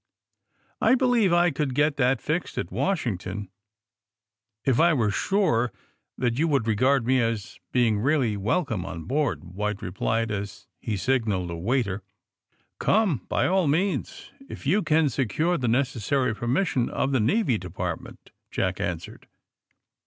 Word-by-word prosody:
" - - -42
*'I - - +5
believe 245 -7 +3
I 175 0 +4
could 135 -2 -2
get 145 0 +2
that 130 -2 +2
fixed 165 +4 -2
at - - -3
"Washing 135 - -1
ton, 95 +2 -6 1.2
if 130 -3 +2
I 170 +1 +5
were 110 -5 +1
sure 125 - +1 0.5
that 120 0 0
you 165 - +3
would 140 -7 +1
regard 125 +4 +2
me 130 +1 +3
as 115 -3 -3
being 115 -4 +2
really 130 -3 +1
welcome 110 - -1
on 85 -2 -6
board," 140 - -1
White 105 +3 -4
replied, 110 +4 -1
as 100 -1 -5
he 105 -3 -3
signaled 100 -5 0
a - - -4
waiter. 100 +1 -1 0.8
^*Come 190 - +1
by - - +1
all 185 -3 +2
means, 180 +7 -1 0.2
if - - -9
you 185 +10 +3
can 155 -3 +3
secure 140 - 0
the 125 - -1
necessary 125 0 +1
permission 120 - 0
of 135 - -1
the 130 - +2
Navy 125 - +2
Department," 90 -1 -6 0.2
Jack - - -1
answered. - - -5
125 Hz, 150 wpm, -25 LUFS, 105-150 Hz, 1.2 s, I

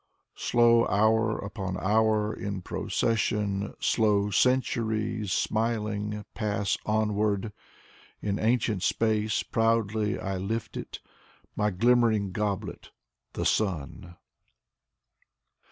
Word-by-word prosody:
Slow 115 -1 +4
hour 110 +2 +2
upon 95 -2 -5
hour 110 +2 +2
in 100 -2 -5
procession, 105 -2 -1
Slow 105 -2 +2
centuries, 110 -3 +1
smiling, 105 -1 -1
pass 105 -2 -1
onward. 105 -1 0 0.7
In 100 0 -2
ancient 110 -3 +1
space 110 +1 +1
proudly 110 -2 0
I 95 0 -3
lift 105 +4 -3
it. - - -7 0.5
My 105 0 +1
glimmering 110 -1 +2
goblet: 100 -2 -3 0.4
the - - -3
Sun. 85 -3 -1
105 Hz, 90 wpm, -27 LUFS, 100-110 Hz, 0.7 s, Slow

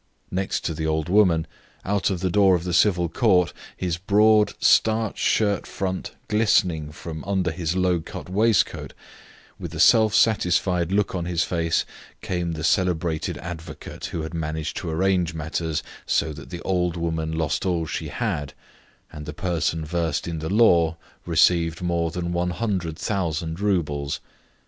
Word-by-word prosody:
Next 95 +1 -1
to 80 - -1
the 80 0 -3
old 80 +1 -1
woman, 90 -5 +4 0.4
out 100 0 +1
of 95 -3 -2
the 95 - 0
door 95 -1 +5
of 85 - -2
the 90 -1 -3
Civil 90 -1 +3
Court, 90 -1 +2 0.2
his 90 -3 -2
broad, 105 +3 +4
starched 110 0 +3
shirt 100 -2 +1
front 95 -1 -4
glistening 90 -8 +2
from 80 0 -7
under 95 -2 0
his 85 0 -2
low 90 -2 +2
cut 80 - -8
waistcoat, 105 +3 +1 0.7
with 85 -1 -7
a - - -5
self 110 +3 +5
satisfied 90 -4 +2
look 105 0 +1
on 90 -2 -2
his 85 -1 0
face, 85 -2 0 0.3
came 85 -2 -2
the 80 -1 -5
celebrated 85 -2 0
advocate 85 +1 -8
who 80 - -4
had 80 - -6
managed 80 -1 -3
to 85 - -4
arrange 90 0 +1
matters 80 0 -2 0.2
so 80 - +1
that 70 -1 -11
the 85 -1 -7
old 90 -2 0
woman 80 -1 -2
lost 80 -3 -1
all 85 -3 0
she - - -4
had, 75 -2 -3 0.6
and 75 -1 -8
the 75 - -5
person 80 -2 -1
versed 85 -1 -1
in 85 -2 -3
the 80 +1 -4
law 85 -7 +4 0.3
received 85 -2 +3
more 85 -1 0
than 85 +1 -3
100,000 85 -2 -2
roubles. 75 -8 -1
85 Hz, 155 wpm, -24 LUFS, 80-95 Hz, 0.7 s, door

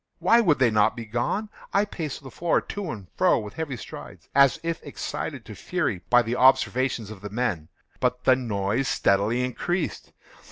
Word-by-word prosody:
Why 235 +1 +4
would 165 -9 +3
they 125 -3 +3
not 110 +1 +3
be 120 -2 -6
gone? 120 - -2 0.2
I 200 +1 +3
paced 155 -8 -6
the 135 - -10
floor 170 +5 +1
to 200 -4 -6
and 105 -9 -6
fro - - +4
with 105 -1 -6
heavy 150 -6 -4
strides, - - -10
as 140 -2 +5
if 165 0 -2
excited - - -5
to - - -9
fury 90 - -2
by 125 0 +6
the 120 +2 -2
observations 130 -3 +3
of 105 -3 -10
the 105 - -6
men—but 120 +4 -3
the 130 - +5
noise 115 +1 -1
steadily 105 +5 +2
increased. 175 +7 -3
125 Hz, 175 wpm, -25 LUFS, 110-150 Hz, 0.2 s, by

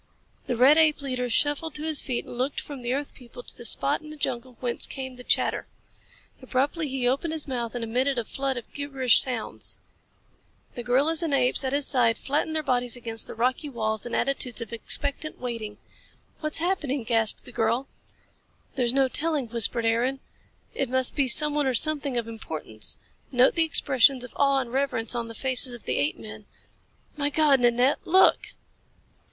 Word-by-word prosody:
The 245 -3 -1
red 270 +6 +6
ape 305 -2 +3
leader 250 -2 -2
shuffled 295 +4 0
to 300 - -3
his 315 -2 +1
feet 250 -3 -3
and - - -9
looked 255 +4 -1
from 285 -3 -8
the 240 0 -3
earth 280 +2 -3
people 245 -1 -12
to - - -9
the 240 - -9
spot 140 - +1
in 305 - -12
the 305 - -9
jungle 250 -3 -4
whence 245 -2 -2
came 260 -1 -6
the 250 0 -11
chatter. - - +1 0.7
Abruptly 280 +5 -1
he 260 -2 -1
opened 280 +6 0
his 315 -2 -2
mouth 240 -3 -3
and 240 - -3
emitted 255 +4 0
a 235 - -1
flood 270 +1 -3
of 240 - -9
gibberish 270 -4 +4
sounds. 250 -4 -1 1.0
The 245 - -5
gorillas 280 +7 +2
and 320 -4 +1
apes 255 +1 +2
at 260 - -1
his 285 0 0
side 240 -5 +2
flattened 300 +3 -2
their 310 - 0
bodies 245 -3 0
against 230 -2 -3
the - - -8
rocky 255 +6 0
walls 220 -4 -2
in 240 - -2
attitudes 255 -2 0
of 230 0 -5
expectant 285 +6 -3
waiting. 230 -4 -5 0.6
"What's 305 -1 -1
happening?" 310 -7 -1
gasped 225 -2 +2
the - - -9
girl. 235 +4 0 0.9
"There's 245 -2 +1
no 270 0 +3
telling," 290 -2 0
whispered 235 0 +2
Aaron. 240 +4 +1 0.5
"It 270 - -2
must 260 0 +2
be 280 -3 +1
someone 295 +2 +3
or 260 - +1
something 285 -2 0
of 230 -1 -2
importance. 155 - -3 0.3
Note 250 0 +4
the 330 -1 +2
expressions 270 -4 +3
of 250 - -10
awe 275 -1 +3
and 240 -1 -8
reverence 265 -5 0
on 235 -1 -3
the 230 - -9
faces 255 -1 -1
of 235 - -13
the - - -1
apemen. 215 -8 -4 0.7
My 285 -1 0
God, 290 -2 +4
Nanette, 245 +3 +3
look!" 375 +3 +4
255 Hz, 185 wpm, -26 LUFS, 240-285 Hz, 1.0 s, red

